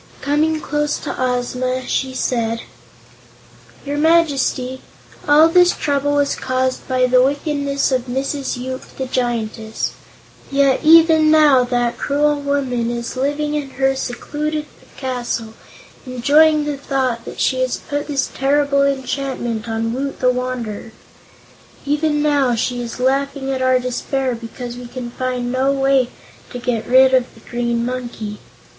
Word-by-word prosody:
Coming 310 +2 +1
close 295 -1 -1
to - - -5
Ozma, 255 0 -1
she 260 -1 -1
said: 230 -3 -1 1.2
"Your 290 +1 -2
Majesty, 280 -5 +2 0.5
all 300 +2 +7
this 355 +1 +5
trouble 285 0 0
was 285 -1 +2
caused 255 0 -2
by 255 -1 +2
the 250 0 +4
wickedness 280 0 0
of 255 -1 0
Mrs. 270 +2 -2
Yoop, 260 +1 -5 0.2
the 265 - -2
Giantess. 230 -3 -2 0.6
Yet 275 -1 +3
even 320 0 +6
now 300 -5 +6
that 245 -1 -1
cruel 290 +1 +1
woman 265 -5 -1
is 235 +1 -4
living 290 +3 -1
in 295 -2 -2
her 270 0 +2
secluded 300 +4 -3 0.3
castle, 240 -4 -3 0.5
enjoying 295 +5 +4
the 295 -1 -2
thought 260 -4 -1
that - - -8
she 260 - +1
has 255 -1 0
put 290 0 -4
this 280 -3 0
terrible 280 +1 +2
enchantment 265 -4 -2
on 225 +1 -1
Woot 275 +2 -4
the 250 -1 +3
Wanderer. 245 -4 -4 0.9
Even 295 +1 +1
now 280 -5 +2
she 245 +2 -1
is 240 0 -6
laughing 270 +1 0
at 260 -1 -2
our 255 0 +4
despair 255 +1 -2
because 240 +1 -7
we 245 0 -8
can 240 -1 -7
find 250 -1 -3
no 260 +2 +1
way 270 -2 +2 0.4
to - - -6
get 240 -2 -2
rid 260 +1 +6
of 255 -1 +2
the - - -16
green 235 -1 -1
monkey. 240 -4 -5
260 Hz, 140 wpm, -19 LUFS, 245-285 Hz, 1.2 s, all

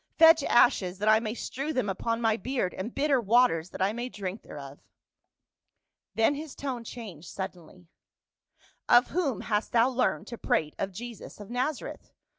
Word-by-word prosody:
Fetch 325 -1 +8
ashes 190 -6 +3
that 210 +2 -2
I 215 0 +6
may 220 0 -4
strew 275 +5 -4
them 255 -6 0
upon 230 +4 -2
my 225 -2 +3
beard, 245 -6 -2
and 220 +6 -6
bitter 280 -3 +2
waters 215 -7 +3
that 185 - -3
I 200 +2 +1
may 240 +2 -4
drink 200 -2 -5
thereof." 140 -1 -10 1.4
Then 225 +5 +3
his 300 0 -7
tone 260 -4 -4
changed 205 -9 -9
sud 190 -1 -4
denly, 175 0 -17 0.6
" - - -55 0.3
Of 245 +1 +6
whom 310 -10 -1
hast 210 -1 -1
thou 235 +2 +5
learned 255 -1 0
to 235 - -7
prate 150 -1 0
of 195 - -2
Jesus 230 +3 -9
of 205 +1 -10
Nazareth 255 +4 -3
230 Hz, 175 wpm, -28 LUFS, 195-255 Hz, 1.4 s, Fetch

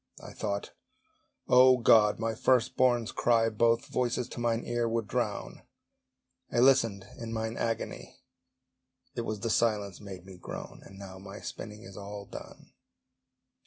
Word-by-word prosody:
I - - -11
thought, 100 -2 -3 0.8
O 130 0 +7
God! 115 -3 +5
my 115 0 -1
first 125 +2 +2
born's 120 -3 +2
cry 115 -1 +3
Both 115 +3 +2
voices 125 -3 -1
to - - -7
mine 115 -1 0
ear 120 -1 0
would 115 -2 -1
drown: - - -3 0.9
I - - -2
listened 120 -6 +4
in 115 -1 -6
mine 110 0 -3
agony, 115 -1 -4 1.0
It 120 - -3
was 110 -3 -4
the 115 - -1
silence 105 -5 0
made 95 -3 -9
me 95 -1 -11
groan! - - -8
And 95 - -14
now 95 -1 -9
my 100 +2 -9
spinning 105 0 -8
is 95 -4 -11
all 100 0 -7
done. - - -11
115 Hz, 150 wpm, -30 LUFS, 100-120 Hz, 1.0 s, O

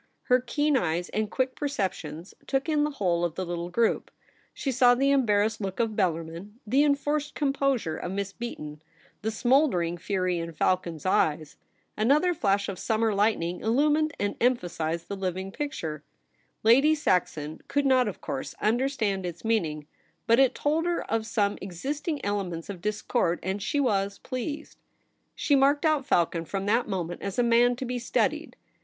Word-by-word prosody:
Her 250 -1 +4
keen 290 +4 0
eyes 175 -4 -1
and 215 -1 -1
quick 260 +2 -1
perceptions 185 - -4
took 270 +1 0
in 305 -2 +2
the 300 - +1
whole 180 -11 0
of 170 -2 -1
the 185 - -3
little 175 0 -4
group. 225 +5 +1 0.4
She 275 - -3
saw 245 -1 +5
the 275 +2 +2
em 270 -4 +3
barrassed 210 +1 +2
look 195 +1 -4
of 225 -2 0
Bellarmin; 170 +1 -2
the 265 +7 +3
enforced 295 +1 0
composure 275 - 0
of 180 - -5
Miss 200 0 -3
Beaton; 150 -11 -7 0.4
the 220 - -1
smouldering 225 - +2
fury 185 -1 -1
in 165 0 -5
Falcon's 170 0 -1
eyes. 155 -4 +1 0.4
Another 290 +11 +3
flash 200 - +1
of 195 -2 -5
summer 220 -1 +1
lightning 195 -4 +1
illumined 295 +6 +2
and 205 0 -1
emphasized 170 -9 0
the 200 - -4
living 190 0 -3
picture. 170 - -4 0.6
Lady 270 +8 +6
Saxon 160 - -1
could 285 0 0
not, 260 -3 +4
of 205 - -5
course, 135 - -5
understand 220 -4 0
its 175 +2 -6
meaning; 160 -10 0 0.4
but 230 +1 +4
it 270 -2 +4
told 315 +3 0
her 345 - 0
of 225 -1 0
some 205 -3 0
existing 285 - -3
elements 195 -4 -3
of 180 -4 -9
discord, 210 -3 0
and 190 +2 -2
she 290 +7 -1
was 200 -6 +1
pleased. 285 +4 -6 0.6
She 285 - +2
marked 280 +3 +3
out 305 -3 +2
Falcon 170 - +2
from 195 +3 -3
that 230 +4 +2
moment 175 -3 -3
as 200 -1 -4
a 245 - +3
man 240 +1 +4
to 260 - -5
be 250 0 -3
studied. 240 - -1
215 Hz, 170 wpm, -27 LUFS, 180-270 Hz, 0.6 s, Lady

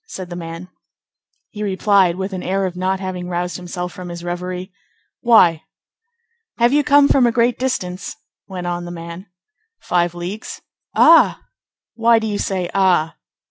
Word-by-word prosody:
said 185 - -8
the - - -5
man. 165 +1 -7 0.8
He 210 - -8
replied, 195 -3 +2
with 190 +1 -4
an 185 - -4
air 195 +2 -1
of 180 -1 -4
not 185 +1 -1
having 185 -2 -5
roused 180 0 -3
himself 180 0 -6
from 180 -2 -8
his 170 0 -7
reverie:— 180 +2 -5 0.5
"Why?" 175 -9 +5 1.0
"Have 240 +2 +3
you 295 0 +3
come 285 0 +5
from 260 -4 +4
a - - +2
great 235 +1 +1
distance?" 190 -8 -3 0.3
went 185 -2 -6
on 175 0 -3
the - - -7
man. 170 +2 -8 0.5
"Five 175 -1 0
leagues." 180 +5 -6 0.4
"Ah!" 330 0 +5 0.5
"Why 230 0 +4
do 220 - -1
you 205 -2 -2
say, 185 -2 -2
'Ah? 180 -5 +2
185 Hz, 160 wpm, -19 LUFS, 175-210 Hz, 1.0 s, Why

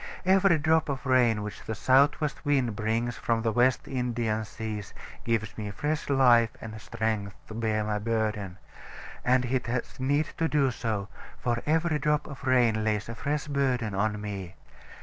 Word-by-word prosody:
Every 190 -2 +5
drop 160 +1 +2
of 140 0 -3
rain 120 -5 +3
which 105 -1 -7
the 110 - -4
south 135 +7 +4
west 150 -2 -3
wind 135 -7 +1
brings 115 +2 -1
from 115 -1 0
the 115 - +1
West 120 +3 +2
Indian 120 -4 -1
seas 105 -2 -6 0.3
gives 110 -3 -1
me 105 -1 -4
fresh 150 +10 -2
life 125 -4 +5
and 110 -1 -8
strength 105 -4 -2
to - - -7
bear 110 -1 0
my 105 0 -1
burden; 105 -4 -2 0.7
and 125 0 +3
it 125 0 -1
has 120 +2 -3
need 145 +4 +1
to 165 - +2
do 140 -4 +2
so; 110 -4 -3 0.3
for 120 -1 -1
every 160 0 +2
drop 150 +1 +1
of 140 -2 -9
rain 120 -4 +3
lays 105 0 -1
a - - -4
fresh 145 +5 -2
burden 130 -7 0
on 105 +2 0
me. 100 -3 -6
120 Hz, 170 wpm, -28 LUFS, 110-135 Hz, 0.7 s, Every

